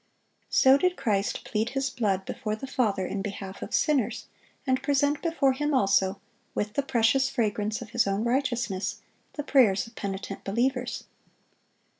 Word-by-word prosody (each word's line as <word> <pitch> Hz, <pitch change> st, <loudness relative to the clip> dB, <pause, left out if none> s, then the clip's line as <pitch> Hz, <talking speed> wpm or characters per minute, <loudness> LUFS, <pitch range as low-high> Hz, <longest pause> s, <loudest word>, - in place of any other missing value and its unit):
So 265 Hz, +1 st, +6 dB
did 365 Hz, +2 st, +1 dB
Christ 205 Hz, -4 st, 0 dB
plead 225 Hz, -2 st, -1 dB
His 270 Hz, 0 st, -1 dB
blood 195 Hz, -6 st, 0 dB
before 215 Hz, -1 st, -3 dB
the 215 Hz, -, -7 dB
Father 220 Hz, -8 st, 0 dB
in 195 Hz, +2 st, -3 dB
behalf 195 Hz, -1 st, -6 dB
of -, -, -6 dB
sinners, 280 Hz, -8 st, +1 dB, 0.4 s
and 260 Hz, -1 st, +1 dB
present 285 Hz, +1 st, +1 dB
before 325 Hz, -6 st, +2 dB
Him 295 Hz, +2 st, 0 dB
also, 195 Hz, -3 st, +2 dB, 0.4 s
with 210 Hz, 0 st, -2 dB
the 280 Hz, -, +1 dB
precious 265 Hz, +1 st, +2 dB
fragrance 215 Hz, -2 st, -1 dB
of 215 Hz, -, -13 dB
His 240 Hz, -4 st, +2 dB
own 195 Hz, +2 st, 0 dB
righteousness, 235 Hz, -6 st, -1 dB, 0.3 s
the 295 Hz, -, -4 dB
prayers 235 Hz, -10 st, +4 dB
of 230 Hz, -, -14 dB
penitent 195 Hz, -2 st, -5 dB
believers. 245 Hz, +4 st, -1 dB
235 Hz, 155 wpm, -27 LUFS, 200-270 Hz, 0.4 s, So